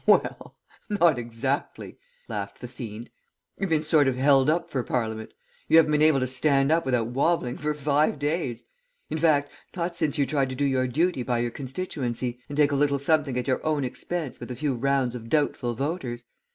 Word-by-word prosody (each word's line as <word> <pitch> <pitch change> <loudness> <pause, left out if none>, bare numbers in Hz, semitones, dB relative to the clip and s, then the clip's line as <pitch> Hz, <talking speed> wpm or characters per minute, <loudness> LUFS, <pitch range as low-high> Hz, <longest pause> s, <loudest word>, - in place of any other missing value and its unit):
"'Well, - - +4 0.5
not 170 -10 +3
exactly' 120 +4 -3 0.3
laughed - - -5
the 125 - -5
fiend. 120 -2 -8 0.5
'You've 195 -1 -1
been 155 -1 +2
sort 150 -2 +4
of 130 - +1
held 135 +1 +4
up 170 +2 +1
for 130 - 0
Parliament; 110 -3 -3 0.4
you - - +6
haven't 160 -2 +5
been 150 0 +2
able 155 -3 +5
to - - +2
stand 135 +2 +2
up 165 -3 +2
without 120 -3 +1
wobbling 135 0 +1
for 150 +1 -2
five 150 +1 +1
days; 145 -5 -2 0.5
in 160 - -1
fact, 150 -3 +3 0.2
not 170 -1 -2
since 155 -2 -1
you 140 - +3
tried 135 -2 0
to 130 - -4
do 140 +2 0
your 130 -2 +1
duty 160 +3 +1
by 120 0 0
your 120 0 -1
constituency, 125 -4 -4
and 145 - -5
take 150 -1 +4
a - - +1
little 140 0 +2
something 140 -2 +1
at 125 - -2
your 130 - 0
own 155 -2 0
expense 150 +2 -4
with 120 - -8
a 125 - -4
few 145 +2 -1
rounds 130 0 +1
of 115 -2 -8
doubtful 125 -5 0
voters. 135 -3 -3
140 Hz, 200 wpm, -26 LUFS, 125-155 Hz, 0.5 s, you